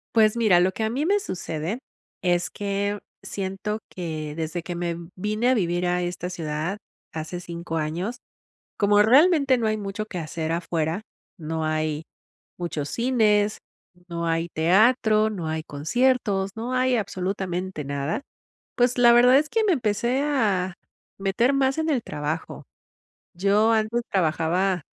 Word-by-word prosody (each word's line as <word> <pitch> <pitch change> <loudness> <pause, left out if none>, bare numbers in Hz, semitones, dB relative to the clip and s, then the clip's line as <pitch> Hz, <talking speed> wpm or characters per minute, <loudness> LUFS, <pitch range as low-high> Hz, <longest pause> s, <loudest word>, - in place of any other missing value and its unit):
Pues, 215 -1 +5
mira, 210 -7 +5
lo 185 +1 +3
que 220 - -4
a 220 - +1
mí 270 +7 -1
me 405 +3 +3
sucede, 180 - -4 0.4
es 175 -1 +1
que 200 0 -2 0.2
siento 195 +2 -4
que 155 -4 -5
desde 165 +1 -3
que 175 - -5
me 170 -1 -2 0.2
vine 215 +5 0
a - - +5
vivir 175 -5 0
a 180 0 +1
esta 175 0 -4
ciudad 160 +2 -3 0.4
hace 160 +3 -5
5 170 -1 -5
años, 170 +10 -2 0.6
como 205 0 +4
realmente 275 +3 +5
no 230 -2 0
hay 215 - +1
mucho 205 +1 -4
que 185 -4 -5
hacer 160 0 -3
afuera, 165 +1 -1 0.4
no 160 -1 -3
hay 155 0 -1 0.5
muchos 165 -5 -3
cines, 215 -4 +2 0.5
no 170 0 -3
hay 165 +1 0
teatro, 215 +5 +4
no 185 -7 -4
hay 160 0 -2
conciertos, 195 - +1
no 235 +3 -4
hay 255 0 +2
absolutamente 185 -4 -3
nada, 140 - -2 0.6
pues, 245 0 +2
la 240 -1 +7
verdad 250 +2 +7
es 300 +1 0
que 450 +5 +1
me 405 - +3
empecé 240 +1 0
a 205 -11 +1 0.4
meter 200 +7 +2
más 270 +1 +1
en 320 0 0
el 260 -6 +1
trabajo. 150 -3 -4 0.7
Yo 200 +4 +3
antes 220 +1 +1
trabajaba 175 +1 +1
195 Hz, 150 wpm, -24 LUFS, 170-230 Hz, 0.7 s, la